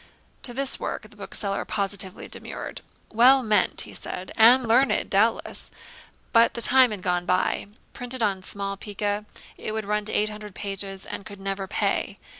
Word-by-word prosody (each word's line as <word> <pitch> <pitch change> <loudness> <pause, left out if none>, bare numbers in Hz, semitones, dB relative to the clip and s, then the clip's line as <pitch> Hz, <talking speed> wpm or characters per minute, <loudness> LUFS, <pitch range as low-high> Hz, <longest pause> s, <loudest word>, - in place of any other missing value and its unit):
To 245 - 0
this 270 0 0
work - - -4
the - - -13
bookseller 200 -1 -2
positively 195 -2 -3
demurred. - - -7 0.3
'Well 255 +4 +6
meant,' 215 -2 +2
he - - -7
said, 185 - -5
'and 240 +2 +7
learned, 255 +4 +3
doubtless; 220 +4 +1 0.6
but 230 +2 +5
the 235 - -3
time 260 -1 +6
had 205 -4 -6
gone 175 0 0
by. 185 +2 +1 0.3
Printed 245 -1 -4
on 195 -3 +1
small 200 +1 -4
pica 205 +1 -3 0.3
it 215 - -4
would 220 -1 -3
run 210 0 -1
to 220 - -2
eight 210 +1 +2
hundred 210 -2 -9
pages, 195 -1 -5
and - - -6
could 200 0 -11
never 195 0 -3
pay. 210 - -1
210 Hz, 170 wpm, -25 LUFS, 195-230 Hz, 0.6 s, and